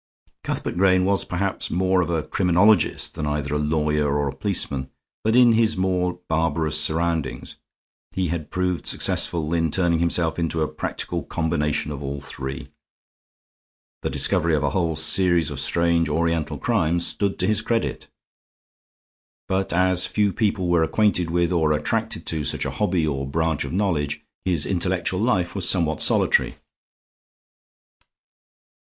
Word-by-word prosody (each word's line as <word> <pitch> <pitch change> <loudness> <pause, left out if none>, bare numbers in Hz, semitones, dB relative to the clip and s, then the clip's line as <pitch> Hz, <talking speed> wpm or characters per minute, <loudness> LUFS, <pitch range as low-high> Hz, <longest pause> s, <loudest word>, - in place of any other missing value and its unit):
Cuthbert - - -3
Grayne 95 -1 +4
was 100 0 +1
perhaps 95 +2 -2
more 95 +1 +2
of 85 - -2
a 80 -2 0
criminologist 90 +3 +2
than 75 -2 -4
either 75 -1 -2
a 75 - 0
lawyer 75 -1 0
or 70 -1 0
a 70 - -5
policeman, 70 -5 -2 0.3
but 110 +1 +2
in 125 -1 +7
his 110 -2 +2
more 90 -1 0
barbarous 80 -1 0
surroundings 80 -3 -2 0.5
he 95 -3 -2
had 80 -2 -4
proved 90 -1 -2
successful 80 -2 0
in 80 -1 +1
turning 85 0 +1
himself 85 -1 0
into 80 -1 -1
a - - 0
practical - - -4
combination 75 -2 -1
of 70 -1 -6
all 70 0 -4
three. 70 -1 -7 1.3
The - - -2
discovery 85 0 +2
of 75 - -1
a 70 - 0
whole 85 -1 0
series 80 +1 +3
of 70 - -5
strange 85 +2 +1
Oriental 80 0 -1
crimes 85 +2 +1
stood 100 -1 -1
to 90 - 0
his 105 +1 +1
credit. 115 0 -2 1.4
But 95 0 -1
as 90 0 +2
few 105 -2 +1
people 100 -3 0
were 85 -1 +3
acquainted 90 0 +1
with, 85 +1 +1
or 80 -3 +2
attracted 75 0 -1
to, 80 -2 -2
such - - 0
a - - -2
hobby 95 -6 0
or 70 -3 -2
branch 80 0 -1
of 70 - -6
knowledge, 85 -7 -1 0.2
his 85 -6 +1
intellectual 90 -1 -1
life 100 -6 +1
was 95 -3 0
somewhat 80 -5 +1
solitary. - - +2
85 Hz, 150 wpm, -23 LUFS, 75-95 Hz, 1.4 s, in